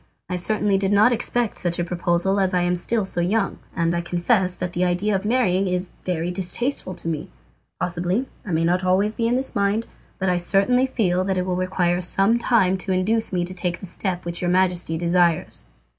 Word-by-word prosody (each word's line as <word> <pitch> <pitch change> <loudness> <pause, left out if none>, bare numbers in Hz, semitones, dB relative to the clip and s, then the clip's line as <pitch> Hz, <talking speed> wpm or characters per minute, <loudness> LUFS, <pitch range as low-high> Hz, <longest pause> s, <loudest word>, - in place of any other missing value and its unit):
I 180 - -2
certainly 200 +2 +1
did 195 0 0
not 215 +4 +5
expect 240 -1 0
such 175 -1 -1
a 175 - 0
proposal 175 +2 0
as 190 -1 +1
I 180 - +2
am 175 0 +1
still 210 +4 0
so 175 -2 0
young, 195 +4 0 0.2
and 170 -1 0
I 170 - -1
confess 180 +2 +1
that 180 -1 -4
the 180 - 0
idea 180 +4 0
of 195 - -2
marrying 200 -5 +1
is 180 0 -1
very 175 -1 -2
distasteful 190 +3 -2
to 170 - -7
me. 155 -3 -3 0.5
Possibly 180 +7 -1 0.2
I - - -9
may 165 0 +1
not 180 +2 +1
always 190 +3 +2
be 230 +1 -1
in 240 - +1
this 265 +1 -2
mind, 205 +3 +1 0.3
but 190 - -2
I 180 -1 +2
certainly 200 +9 +2
feel 185 -8 0
that 190 -1 -1
it 180 - -1
will 185 -1 -1
require 180 -1 0
some 195 +6 +2
time 195 -6 +2
to 190 +1 -4
induce 215 +5 +1
me 175 -2 0
to 180 - -6
take 180 -1 -2
the - - -8
step 180 -1 -2
which 170 0 -2
your 175 - 0
Majesty 180 -2 +1
desires." 170 -1 0
185 Hz, 215 wpm, -22 LUFS, 175-205 Hz, 0.5 s, not